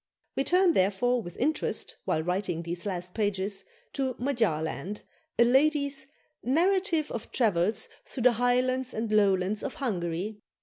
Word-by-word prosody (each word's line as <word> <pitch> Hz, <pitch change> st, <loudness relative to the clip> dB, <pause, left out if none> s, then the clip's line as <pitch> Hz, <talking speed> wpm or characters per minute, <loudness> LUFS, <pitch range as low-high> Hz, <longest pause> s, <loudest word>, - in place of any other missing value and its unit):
We 270 Hz, -, +1 dB
turn, 360 Hz, -1 st, +4 dB
therefore, 220 Hz, +5 st, +2 dB
with 175 Hz, -4 st, -9 dB
interest, 305 Hz, +5 st, -1 dB
while 160 Hz, -, 0 dB
writing 180 Hz, -1 st, -1 dB
these 170 Hz, +3 st, -4 dB
last 180 Hz, -2 st, -4 dB
pages, 200 Hz, -2 st, 0 dB, 0.3 s
to 265 Hz, -3 st, -1 dB
"Magyarland," 205 Hz, -, -1 dB, 0.3 s
a 235 Hz, -, +7 dB
lady's 280 Hz, +1 st, +2 dB, 0.3 s
"Narrative 335 Hz, -, +1 dB
of 230 Hz, -, -5 dB
Travels 210 Hz, -2 st, +1 dB, 0.2 s
through 255 Hz, -, -5 dB
the 250 Hz, -, +7 dB
Highlands 250 Hz, +2 st, +1 dB
and 220 Hz, 0 st, -2 dB
Lowlands 200 Hz, -1 st, +3 dB
of 280 Hz, -, -4 dB
Hungary." 205 Hz, -, -3 dB
225 Hz, 135 wpm, -28 LUFS, 190-265 Hz, 0.3 s, a